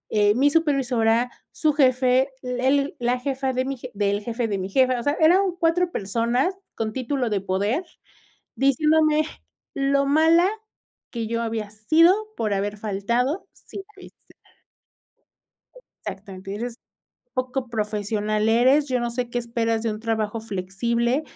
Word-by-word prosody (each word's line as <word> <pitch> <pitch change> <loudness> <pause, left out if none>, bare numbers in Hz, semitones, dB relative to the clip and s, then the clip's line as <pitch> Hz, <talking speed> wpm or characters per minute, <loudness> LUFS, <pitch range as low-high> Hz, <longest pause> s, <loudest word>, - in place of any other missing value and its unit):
Eh, 205 0 +4
mi 285 +3 +3
supervisora, 250 -7 +2 0.2
su 305 -2 +1
jefe, 255 -1 +3
el 260 +3 0
la 245 +1 +1
jefa 265 0 -2
de 255 0 -1
mi 270 0 -3
jef 250 +1 -8
del 205 0 0
jefe, 235 +1 -2
de 200 -2 -2
mi 190 +1 -4
jefa. 255 +2 +2
O - - -3
sea, 285 - +1
eran 345 +5 +5 0.2
4 345 +2 +2
personas, 235 - 0 0.2
con 220 -1 -3
título 255 -2 -2
de 200 -2 0
poder, 205 - -1 0.7
diciéndome 305 +3 +3 0.5
lo 275 0 +1
mala 320 +5 +4 0.6
que 230 -2 -3
yo 230 +1 -1
había 220 -2 -3
sido, 315 +12 +4 0.2
por 215 -2 0
haber 205 +1 -2
faltado, 235 - -1
sin 395 - -9 0.2
avisar. 375 - -17 1.7
Exactamente 195 0 -7
Eres 235 +2 -4 0.6
poco 255 0 -2
profesional, 215 -1 -1
eres 260 +6 +4
yo 255 -1 +1
no 240 0 -2
sé 240 0 -3
qué 245 - -1
esperas 230 -1 -1
de 230 - 0
un 215 - -7
trabajo 220 -1 -2
flexible, 235 +6 -1
240 Hz, 145 wpm, -23 LUFS, 215-275 Hz, 1.7 s, eran